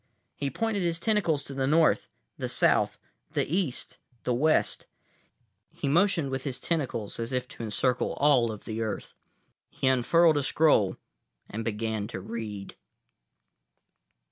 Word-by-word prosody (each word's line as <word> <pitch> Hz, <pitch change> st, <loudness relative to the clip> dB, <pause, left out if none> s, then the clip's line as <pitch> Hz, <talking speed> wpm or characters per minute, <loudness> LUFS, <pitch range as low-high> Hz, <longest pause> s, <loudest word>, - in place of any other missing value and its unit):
He 140 Hz, -, -2 dB
pointed 215 Hz, -, -1 dB
his 170 Hz, -1 st, 0 dB
tentacles 170 Hz, -9 st, +1 dB
to 140 Hz, -, -7 dB
the 135 Hz, -1 st, 0 dB
north, 160 Hz, +2 st, +3 dB, 0.3 s
the -, -, -4 dB
south, -, -, +2 dB, 0.4 s
the -, -, +1 dB
east, 165 Hz, -4 st, -2 dB, 0.2 s
the 125 Hz, -, 0 dB
west. 155 Hz, +6 st, +2 dB, 0.8 s
He -, -, -5 dB
motioned 170 Hz, -2 st, +2 dB
with 135 Hz, 0 st, -3 dB
his 135 Hz, -4 st, -4 dB
tentacles, 135 Hz, -12 st, -2 dB
as 115 Hz, +1 st, -3 dB
if 125 Hz, -1 st, -1 dB
to -, -, -10 dB
encircle 120 Hz, +4 st, 0 dB
all 130 Hz, -6 st, +3 dB
of 105 Hz, -, -9 dB
Earth. 110 Hz, -1 st, -3 dB, 0.6 s
He -, -, -4 dB
unfurled 150 Hz, +5 st, +4 dB
a -, -, +2 dB
scroll 145 Hz, -10 st, +3 dB, 0.5 s
and 110 Hz, +2 st, -3 dB
began 110 Hz, -1 st, -2 dB
to 110 Hz, -, -6 dB
read. 105 Hz, -1 st, -6 dB
135 Hz, 140 wpm, -28 LUFS, 115-160 Hz, 0.8 s, unfurled